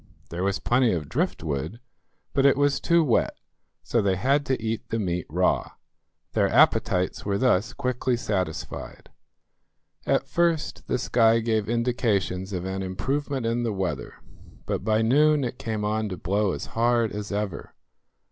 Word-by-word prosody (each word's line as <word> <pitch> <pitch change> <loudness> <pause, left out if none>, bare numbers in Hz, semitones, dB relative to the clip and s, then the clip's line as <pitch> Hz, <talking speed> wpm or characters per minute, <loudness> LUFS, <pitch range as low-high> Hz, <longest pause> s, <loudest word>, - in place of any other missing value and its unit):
There 85 +2 -3
was 100 0 +1
plenty 120 -2 +2
of 80 -5 -3
driftwood, 80 - -2 0.5
but 135 - +2
it 140 -1 +5
was 145 -1 +2
too 170 -1 +3
wet; 125 -7 +1 0.5
so 115 - +1
they 100 -2 +1
had 140 +8 +1
to 130 - 0
eat 115 0 -3
the 115 - -1
meat 90 -5 -2
raw. - - +1 0.6
Their - - +2
appetites 90 0 +3
were 100 -1 0
thus 120 -1 +2
quickly 125 0 -1
satisfied. 95 -8 -4 1.0
At - - +1
first 170 -3 0
the - - +1
sky 115 -2 +3
gave 110 -2 0
indications 110 -6 0
of 90 -2 -3
an 95 0 -3
improvement 135 +8 -2
in 115 +1 0
the 115 -2 -1
weather, 95 -2 -3 0.5
but - - -2
by 110 +1 +2
noon 150 +5 +4
it 125 0 -4
came 110 -2 -3
on 110 0 -1
to 90 - -5
blow 100 +2 0
as - - -5
hard 115 -1 +2
as 105 -1 -5
ever. 100 -3 -4
110 Hz, 155 wpm, -25 LUFS, 95-125 Hz, 1.0 s, it